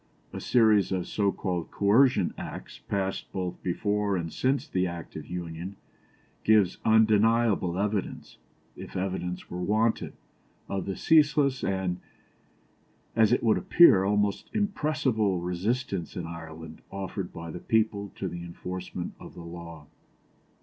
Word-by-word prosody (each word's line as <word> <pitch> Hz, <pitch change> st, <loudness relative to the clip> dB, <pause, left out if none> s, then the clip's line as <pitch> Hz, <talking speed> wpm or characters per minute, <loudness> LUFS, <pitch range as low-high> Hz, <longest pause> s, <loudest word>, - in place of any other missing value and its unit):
A -, -, -5 dB
series 110 Hz, -6 st, +4 dB
of 95 Hz, -2 st, -1 dB
so 100 Hz, -2 st, +1 dB
called 90 Hz, -5 st, -3 dB
Coercion 105 Hz, -1 st, +3 dB
Acts, -, -, -8 dB
passed 95 Hz, -1 st, -3 dB
both 90 Hz, -2 st, -4 dB
before 100 Hz, +2 st, 0 dB
and 85 Hz, -2 st, -4 dB
since 135 Hz, +2 st, 0 dB
the 90 Hz, 0 st, 0 dB
Act 85 Hz, -1 st, -7 dB
of -, -, -7 dB
Union, 90 Hz, +2 st, -6 dB, 0.7 s
give 105 Hz, -4 st, +4 dB
undeniable 110 Hz, -3 st, +3 dB
evidence, 100 Hz, -1 st, -3 dB, 0.4 s
if -, -, -10 dB
evidence 90 Hz, -1 st, -3 dB
were 90 Hz, +1 st, -4 dB
wanted, 110 Hz, +4 st, +1 dB, 0.5 s
of 95 Hz, -1 st, -3 dB
the 95 Hz, -, -2 dB
ceaseless 145 Hz, -4 st, +3 dB
and, 95 Hz, -2 st, -1 dB, 1.2 s
as 110 Hz, -1 st, +4 dB
it 125 Hz, -, +2 dB
would 110 Hz, -2 st, +3 dB
appear, 170 Hz, -, +6 dB
almost 105 Hz, 0 st, 0 dB
irrepressible 150 Hz, -, +1 dB
resistance 95 Hz, +2 st, -2 dB
in 90 Hz, -, -3 dB
Ireland 80 Hz, -1 st, -9 dB
offered 95 Hz, -1 st, -5 dB
by 85 Hz, 0 st, -7 dB
the 90 Hz, -, -6 dB
people 105 Hz, -2 st, 0 dB
to 95 Hz, -, -3 dB
the 85 Hz, -1 st, -6 dB
enforcement 90 Hz, +1 st, -6 dB
of -, -, -11 dB
the 85 Hz, -, -9 dB
law. 85 Hz, -2 st, -9 dB
95 Hz, 135 wpm, -28 LUFS, 90-110 Hz, 1.2 s, appear